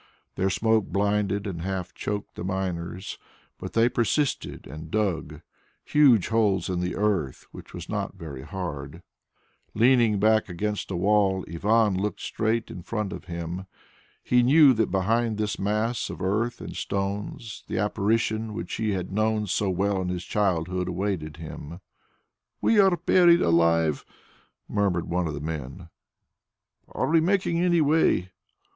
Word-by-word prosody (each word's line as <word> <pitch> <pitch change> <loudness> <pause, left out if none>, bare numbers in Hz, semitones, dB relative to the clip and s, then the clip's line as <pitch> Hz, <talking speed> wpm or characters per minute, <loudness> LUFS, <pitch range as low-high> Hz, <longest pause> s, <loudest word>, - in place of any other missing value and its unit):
Their 95 - 0
smoke 110 +2 +2
blinded 100 +1 0
and 90 -5 -4
half 90 -1 -4
choked 105 -1 -4
the - - -7
miners, 95 -1 -4 0.4
but - - -7
they 115 +1 +4
persisted 125 +4 -1
and 80 +1 -9
dug 85 -7 -2 0.4
huge 135 -9 +4
holes 105 -6 +1
in 90 -1 -1
the 90 0 -2
earth 95 -11 -1
which - - -12
was 85 -1 -8
not 100 -2 -3
very 75 -7 -8
hard. 80 -1 -6 0.7
Leaning 120 -1 +4
his 100 - -1
back 110 0 +3
against 105 +4 -3
a 95 - -3
wall, 95 0 +2
Ivan 105 +4 +2
looked 105 +1 -2
straight 115 +1 -1
in 90 - -8
front 105 +1 -3
of - - -8
him. 85 +2 -5 0.6
He 125 0 +3
knew 140 +2 +6
that 110 -2 +1
behind 110 +3 +1
this 105 -1 -2
mass 105 +4 -1
of - - -7
earth 110 +6 -1
and - - -7
stones 100 +3 -4
the - - -3
Apparition 110 +2 0
which 115 - -5
he 110 -2 -1
had 95 -1 -4
known 110 0 +1
so 100 +1 0
well 95 +1 0
in 90 - -2
his 90 0 -4
childhood 90 -3 0
awaited 90 -4 -3
him. 80 +1 -8 0.8
"We 225 - +3
are 190 -3 +5
buried 170 +1 +5
alive!" 85 -2 +3 0.6
murmured 100 -5 0
one 90 0 0
of 75 - -4
the 75 - -6
men. 80 +2 -6 1.0
"Are - - -2
we 160 +1 +4
making 180 -1 +1
any 175 -1 +3
way?" 145 - +2
100 Hz, 150 wpm, -26 LUFS, 90-110 Hz, 1.0 s, knew